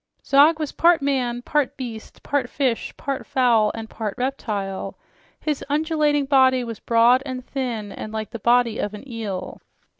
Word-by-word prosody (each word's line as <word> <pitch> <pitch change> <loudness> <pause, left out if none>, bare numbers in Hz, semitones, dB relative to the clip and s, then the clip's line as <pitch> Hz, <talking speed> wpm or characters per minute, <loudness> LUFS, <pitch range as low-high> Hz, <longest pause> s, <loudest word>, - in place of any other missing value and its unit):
Zog 290 +3 +5
was 305 -2 -3
part 335 -3 +3
man, 250 -3 0
part 295 -2 0
beast, 235 -4 -8
part 275 -4 -1
fish, 260 -5 -1
part 275 -1 -3
fowl, 235 -5 +3
and 225 0 -6
part 215 -2 -5
reptile. 210 -7 -3 0.4
His 300 -3 -2
undulating 300 -1 +1
body 260 -2 +4
was 230 -3 -6
broad 235 +2 +4
and 255 -2 -6
thin 235 -7 -4
and 215 - -7
like 220 -1 -5
the 230 - -6
body 235 0 +3
of 210 0 -3
an 210 - -11
eel. 215 -6 -5
250 Hz, 160 wpm, -23 LUFS, 225-275 Hz, 0.4 s, Zog